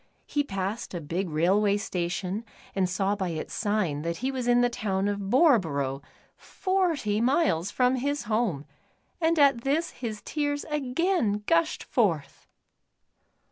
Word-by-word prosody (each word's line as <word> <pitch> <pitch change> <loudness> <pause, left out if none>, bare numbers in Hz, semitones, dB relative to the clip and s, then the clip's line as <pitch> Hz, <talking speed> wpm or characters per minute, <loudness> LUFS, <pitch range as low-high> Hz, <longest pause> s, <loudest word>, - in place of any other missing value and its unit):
He 290 - 0
passed 195 -3 -4
a - - -2
big 170 +4 -3
railway 195 +6 +2
station 180 +1 -3 0.3
and 190 -2 +1
saw 195 +2 0
by 190 -3 -2
its 160 -2 -5
sign 205 -9 0
that 170 +1 -3
he 260 +2 -2
was 255 -2 -3
in 245 0 +5
the 245 - +4
town 200 -5 -1
of 205 0 -1
Boreborough, 165 - +3 0.3
forty 335 - 0
miles 235 - +2
from 250 +3 +2
his 285 +3 -1
home, 215 -10 -1 0.6
and 330 +1 +2
at 275 -5 +5
this 290 +6 0
his 220 -4 -6
tears 290 -1 -2
again 280 - 0
gushed 330 +2 +1
forth. 165 - -1
215 Hz, 140 wpm, -27 LUFS, 185-275 Hz, 0.6 s, in